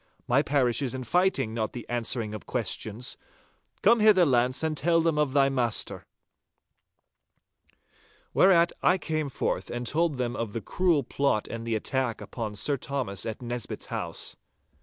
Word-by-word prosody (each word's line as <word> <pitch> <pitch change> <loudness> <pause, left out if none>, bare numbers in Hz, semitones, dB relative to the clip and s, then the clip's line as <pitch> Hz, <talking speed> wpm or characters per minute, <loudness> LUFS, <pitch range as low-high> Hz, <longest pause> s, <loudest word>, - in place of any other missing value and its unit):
My 130 +3 +4
parish 140 -4 +1
is 130 -2 -1
fighting, 175 -9 +2
not 110 -2 -2
the 120 - -7
answering 115 -2 -1
of 105 - -8
questions. 115 0 -3 0.7
Come 230 +3 +6
hither, 210 -4 +6
Launce, 130 0 +2
and 160 -1 0
tell 165 +3 +2
them 165 -2 +1
of 145 -3 +1
thy 140 -1 +5
master!' 125 -5 -1 2.3
Whereat 170 -3 +5
I 180 - +4
came 155 -4 -2
forth - - -2
and 120 0 -4
told 155 +2 0
them 120 -1 -2
of 115 -3 -4
the 115 - -3
cruel 170 - +1
plot 125 -3 0
and 115 0 -6
the 115 - 0
attack 125 +1 -1
upon 110 -3 -5
Sir 140 +8 0
Thomas 125 -8 -3
at 110 +2 -5
Nisbett's 120 -3 -4
house. - - -2
130 Hz, 155 wpm, -27 LUFS, 115-155 Hz, 2.3 s, Come